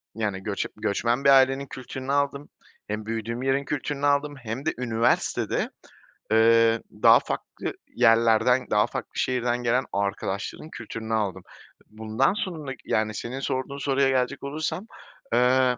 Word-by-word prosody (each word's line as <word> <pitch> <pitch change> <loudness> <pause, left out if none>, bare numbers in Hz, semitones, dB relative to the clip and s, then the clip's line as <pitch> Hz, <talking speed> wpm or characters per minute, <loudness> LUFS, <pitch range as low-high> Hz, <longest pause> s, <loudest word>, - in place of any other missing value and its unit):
yani, 105 -4 -2
göç 100 -2 -2
göçmen 120 +5 0
bir 140 - +5
ailenin 135 0 +5
kültürünü 130 +1 -6
aldım, 140 0 0 0.4
hem 105 0 -4
büyüdüğüm 115 +2 -3
yerin 135 +1 +1
kültürünü 145 0 -2
aldım, 145 +1 +2
hem 125 +1 -6
de 160 - +1
üniversitede, 115 -1 0 0.6
ııı, 115 0 +5 0.2
daha - - +8
farklı - - -5 0.2
yerlerden, 115 +3 +4
daha 105 0 +4
farklı - - -6
şehirden 125 -1 0
gelen 125 +2 +2
arkadaşların 100 +7 -3
kültürünü 115 -3 -6
aldım. 105 -4 -1 0.5
Bundan 110 - 0
sonraki, 155 -10 -5
yani, 110 0 0
senin 120 +6 -5
sorduğun 130 +1 -3
soruya 140 -1 +2
gelecek 130 +1 0
olursam, 155 +7 -3 0.5
ııı, 125 0 +3
125 Hz, 135 wpm, -25 LUFS, 110-140 Hz, 0.6 s, daha